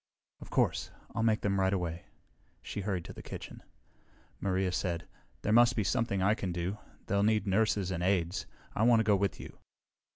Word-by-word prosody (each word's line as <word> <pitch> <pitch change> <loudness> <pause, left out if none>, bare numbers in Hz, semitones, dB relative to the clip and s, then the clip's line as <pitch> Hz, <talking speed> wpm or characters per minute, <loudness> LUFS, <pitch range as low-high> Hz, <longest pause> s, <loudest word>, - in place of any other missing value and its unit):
"Of - - -11
course. - - +1 0.2
I'll 115 - -1
make 110 -1 +2
them 100 -1 +1
right 95 0 +3
away." 85 -3 -2 0.6
She 105 - -4
hurried 95 -4 -2
to - - -8
the - - -9
kitchen. - - -8 0.8
Maria 95 -1 0
said, 85 -2 -2 0.4
"There 105 - +2
must 120 +1 +6
be 110 - +1
something 100 -3 0
I 100 +2 +4
can 95 -5 -3
do. 90 +4 -3 0.3
They'll 100 0 +1
need 110 +1 +3
nurses 100 -1 +1
and 85 -2 -2
aides. 90 -1 0 0.3
I - - -2
want 115 0 +6
to - - +1
go 105 -1 +4
with 100 -2 0
you." - - -10
100 Hz, 190 wpm, -31 LUFS, 90-110 Hz, 0.8 s, must